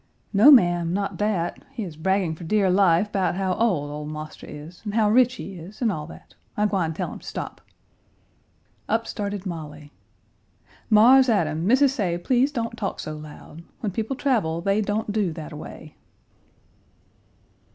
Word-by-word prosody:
"No, 210 +8 +7
ma'am, 175 - +5
not 200 +1 -2
that. 200 -5 -1
He 225 - -4
is 170 -5 -7
bragging 185 +1 0
for 160 - -10
dear 195 +2 +2
life 190 +1 +3
'bout 190 -2 0
how 190 -1 0
ole 180 -10 0
ole 150 0 -6
marster 155 0 -8
is 150 +4 -10
and 210 -1 -4
how 215 -2 +3
rich 250 +2 +4
he 195 - -8
is, 180 +3 -11
an' 235 -4 +1
all 150 -5 -5
that. - - -14 0.2
I 210 - +2
gwine 180 -6 0
tell - - -4
him - - -10
stop." - - -7 1.3
Up 230 0 +1
started 205 -3 -4
Molly. 150 -4 -7 1.0
"Mars 250 +5 +6
Adam, 165 -5 +1
Missis 265 +3 +4
say 185 -9 -1
please 255 +9 +1
don't 230 -4 -3
talk 205 -4 -4
so 155 - -5
loud. 150 +1 -11 0.2
When 210 - -2
people 225 +7 -3
travel 225 - 0
they 195 +4 +1
don't 210 +1 -2
do 205 -4 0
that 155 -2 -8
a - - -8
way." 155 0 -10
195 Hz, 170 wpm, -24 LUFS, 165-220 Hz, 1.3 s, No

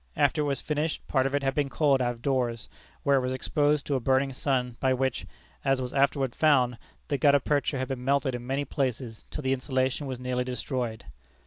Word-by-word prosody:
After 145 +1 +3
it - - 0
was 140 -1 -1
finished, 150 +1 -2
part 130 -1 +2
of 135 - -2
it 145 - 0
had 135 0 +1
been 145 -1 0
coiled 140 -2 +2
out 120 -1 +1
of 115 - -19
doors, 120 -6 0 0.4
where 140 -1 +4
it - - +2
was 130 0 -1
exposed 145 +2 +1
to 145 - -1
a 135 - +2
burning 135 +2 +1
sun, 125 -2 -1
by 130 -1 +2
which, 130 -1 -1 0.4
as 135 -1 +2
was 125 -1 -4
afterward 135 -2 +2
found, 130 -6 +3 0.3
the 140 - 0
gutta 145 -2 +5
percha 145 +1 0
had 130 -1 -3
been 130 -2 -4
melted 135 0 +1
in 120 0 -5
many 135 +2 -1
places 125 -5 -3
till 150 - -6
the 130 0 +2
insulation 130 +1 -1
was 130 -2 -4
nearly 125 0 -1
destroyed. 125 -2 -3
135 Hz, 220 wpm, -28 LUFS, 125-140 Hz, 0.4 s, gutta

